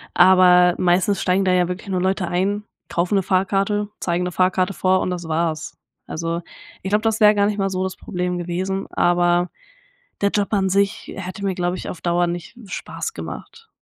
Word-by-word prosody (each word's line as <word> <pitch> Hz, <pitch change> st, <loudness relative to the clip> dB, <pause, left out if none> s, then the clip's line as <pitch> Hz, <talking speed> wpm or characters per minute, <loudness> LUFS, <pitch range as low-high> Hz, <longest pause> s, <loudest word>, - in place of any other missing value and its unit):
Aber 180 Hz, -1 st, +6 dB
meistens 185 Hz, +3 st, +2 dB
steigen 190 Hz, +1 st, +2 dB
da 185 Hz, -, +3 dB
ja 180 Hz, -1 st, +3 dB
wirklich 180 Hz, +3 st, -6 dB
nur 185 Hz, -1 st, 0 dB
Leute 190 Hz, 0 st, 0 dB
ein, 195 Hz, +4 st, 0 dB, 0.2 s
kaufen 180 Hz, +4 st, 0 dB
'ne -, -, +3 dB
Fahrkarte, 195 Hz, +2 st, 0 dB
zeigen 175 Hz, 0 st, -1 dB
'ne 180 Hz, -, -2 dB
Fahrkarte 185 Hz, +1 st, +1 dB
vor 185 Hz, 0 st, +2 dB
und -, -, -1 dB
das 175 Hz, -2 st, -5 dB
war's. 160 Hz, 0 st, -2 dB, 0.3 s
Also 165 Hz, +1 st, -3 dB, 0.4 s
ich 190 Hz, -, -4 dB
glaube, 210 Hz, +2 st, +1 dB
das 225 Hz, -1 st, +1 dB
wäre 210 Hz, -1 st, +6 dB
gar 200 Hz, 0 st, +3 dB
nicht 210 Hz, 0 st, -1 dB
mal 195 Hz, 0 st, +1 dB
so 185 Hz, 0 st, -2 dB
das 190 Hz, 0 st, -3 dB
Problem 180 Hz, -1 st, -3 dB
gewesen, 185 Hz, +3 st, -3 dB
aber 175 Hz, 0 st, +2 dB, 0.7 s
der 200 Hz, -, +2 dB
Job 205 Hz, 0 st, -1 dB
an 195 Hz, -2 st, +2 dB
sich 200 Hz, +2 st, 0 dB
hätte 190 Hz, +1 st, -6 dB
mir, 190 Hz, -2 st, -1 dB
glaube 180 Hz, 0 st, -1 dB
ich, -, -, -7 dB
auf 175 Hz, -, -7 dB
Dauer 175 Hz, 0 st, +1 dB
nicht 175 Hz, +6 st, -6 dB
Spaß 445 Hz, -, -5 dB
gemacht. 455 Hz, 0 st, -9 dB
185 Hz, 195 wpm, -21 LUFS, 175-195 Hz, 0.7 s, Aber